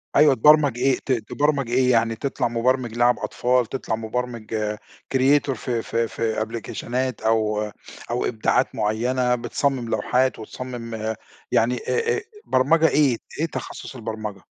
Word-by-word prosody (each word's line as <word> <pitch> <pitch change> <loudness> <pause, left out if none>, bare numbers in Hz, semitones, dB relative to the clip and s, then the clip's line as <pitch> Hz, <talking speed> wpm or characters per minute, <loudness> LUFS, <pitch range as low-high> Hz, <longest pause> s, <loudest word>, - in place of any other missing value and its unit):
أيوه 145 -2 +6
تبرمج 145 0 +5
إيه 130 +2 +2
ت 135 - -1
تبرمج 135 +3 0
إيه 125 +1 +3
يعني 115 -1 +2
تطلع 135 +1 -1
مبرمج 120 0 0
لعب 120 +1 +3
أطفال، 125 0 +1
تطلع 120 -1 -3
مبرمج 110 -2 -3 0.4
creator 135 +2 +4
في 120 -2 -2
في 115 +1 -1
في 110 -1 -2
أبليكيشنات 120 +2 -3
أو 105 -1 +1 0.4
أو 120 +1 -1
إبداعات 110 -2 +1
معيّنة 125 +4 +1
بتصمم 125 0 -1
لوحات، 130 +2 +1
وتصمم 115 -2 -5 0.4
يعني 120 +2 +2
أ 460 - 0
أ - - -3 0.2
برمجة 155 +5 +4
إيه؟ 140 -6 +3 0.2
إيه 160 - +2
تخصص 150 - -7
البرمجة؟ 110 -4 -5
120 Hz, 135 wpm, -23 LUFS, 110-130 Hz, 0.4 s, أيوه